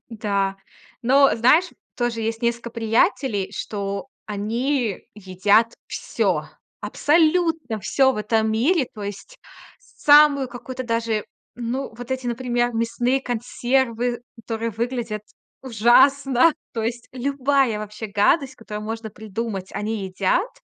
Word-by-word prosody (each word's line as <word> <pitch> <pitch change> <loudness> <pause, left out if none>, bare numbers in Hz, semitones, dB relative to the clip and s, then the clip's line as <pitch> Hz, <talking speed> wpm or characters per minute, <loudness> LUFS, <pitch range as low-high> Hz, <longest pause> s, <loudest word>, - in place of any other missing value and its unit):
Да, 200 -3 -1 0.5
но 270 +3 +5
знаешь, 280 +10 +4 0.3
тоже 240 -2 -1
есть 225 0 -2
несколько 235 0 -1
приятелей, 225 -1 +1
что 200 +1 -4 0.2
они 225 +2 -1
едят 205 +3 +2
всё, - - -1 0.4
абсолютно 320 -5 +1
всё 265 +5 +3
в - - -7
этом 220 +1 +1
мире. 270 +6 +2
То 210 - -8
есть 205 - -7 0.4
самую 290 - +4
какую-то 255 +1 -7
даже 230 -3 -1 0.3
ну, 245 +2 -3
вот 245 +2 -9
эти, 260 -1 -2
например, 240 0 0
мясные 240 +3 0
консервы, 245 0 -1 0.2
которые 230 0 -4
выглядят 230 -1 -3 0.4
ужасно. 265 +5 +4 0.2
То 225 - -3
есть, 235 +2 -4
любая 270 -2 +1
вообще 210 +1 -6
гадость, 260 +7 +2
которую 210 -2 -7
можно 225 0 -5
придумать, 210 -2 -5
они 210 -2 -3
едят. 190 - 0
235 Hz, 115 wpm, -22 LUFS, 215-260 Hz, 0.5 s, но